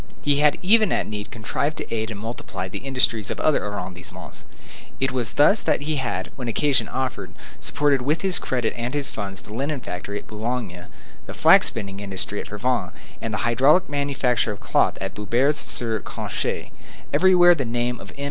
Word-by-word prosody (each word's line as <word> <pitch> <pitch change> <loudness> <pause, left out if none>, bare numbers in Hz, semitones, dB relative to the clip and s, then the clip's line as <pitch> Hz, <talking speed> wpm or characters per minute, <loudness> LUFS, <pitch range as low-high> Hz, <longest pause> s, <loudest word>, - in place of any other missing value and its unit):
He 145 -1 +3
had 150 0 +4
even 215 +2 +5
at - - +1
need 105 0 -5
contrived 140 +8 -2
to - - -5
aid 110 0 -1
and 105 -3 -6
multiply 105 -4 -5
the 95 - -6
industries 130 -5 +1
of - - -4
other 155 - +2
arrondissements. 90 -3 -6 0.5
It 135 - +1
was 125 -3 -1
thus 150 +9 +5
that - - +1
he 150 +1 -1
had, 95 -8 -3
when 125 -3 -6
occasion 135 +4 +2
offered, 130 -1 -4 0.3
supported 145 -3 +2
with 150 +7 0
his 190 -2 +1
credit 125 -3 -1
and 120 +3 -3
his 145 -2 -1
funds 100 -2 -5
the 105 - -11
linen 140 +4 -2
factory 100 -1 -5
at - - -8
Boulogne, 110 -5 -4 0.4
the - - -7
flax - - +7
spinning 100 -3 -4
industry 100 0 -3
at - - -9
Frévent, 120 +3 -1 0.3
and 115 - -3
the 105 - -1
hydraulic 135 +10 +4
manufacture 140 -5 0
of 100 - -7
cloth - - +1
at 95 - -4
Boubers 120 +8 +1
sur 115 -2 -1
Canche. - - -4 0.4
Everywhere 175 +2 +6
the 150 -5 -2
name 120 +1 -1
of - - -10
M. - - -13
120 Hz, 185 wpm, -23 LUFS, 105-145 Hz, 0.5 s, flax